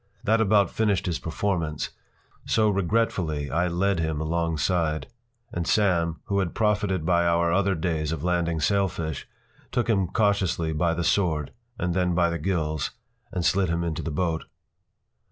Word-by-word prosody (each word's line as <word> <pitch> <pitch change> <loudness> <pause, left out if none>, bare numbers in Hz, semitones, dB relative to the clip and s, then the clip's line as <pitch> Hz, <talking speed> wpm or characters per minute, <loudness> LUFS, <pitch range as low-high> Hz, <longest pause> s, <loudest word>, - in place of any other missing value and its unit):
That 110 +1 +3
about 100 -3 +3
finished 105 -4 +1
his 85 -2 -1
performance, 85 -3 -2 0.6
so 110 -1 +3
regretfully 90 - 0
I 85 +5 +1
led 90 +2 +1
him 80 -2 -1
alongside; 80 0 0 0.5
and 85 -1 -2
Sam, 85 -6 +2
who 100 0 0
had 90 -3 -2
profited 105 -5 +1
by 85 0 +3
our 85 0 +2
other 95 0 +2
days 80 -2 -1
of 80 -2 -4
landing 85 -2 0
sailfish, 90 -3 0 0.4
took 125 -2 0
him 100 -5 +2
cautiously 95 -5 +1
by 85 +2 +1
the 85 - -1
sword, 80 -7 +1 0.3
and 90 -1 -1
then 90 -1 +1
by 85 0 +3
the 85 - -3
gills, 80 -4 -1 0.4
and 90 -2 -2
slid 95 -3 +2
him 85 +1 0
into 80 -3 -2
the - - -4
boat. 80 +1 -1
85 Hz, 155 wpm, -26 LUFS, 80-100 Hz, 0.6 s, That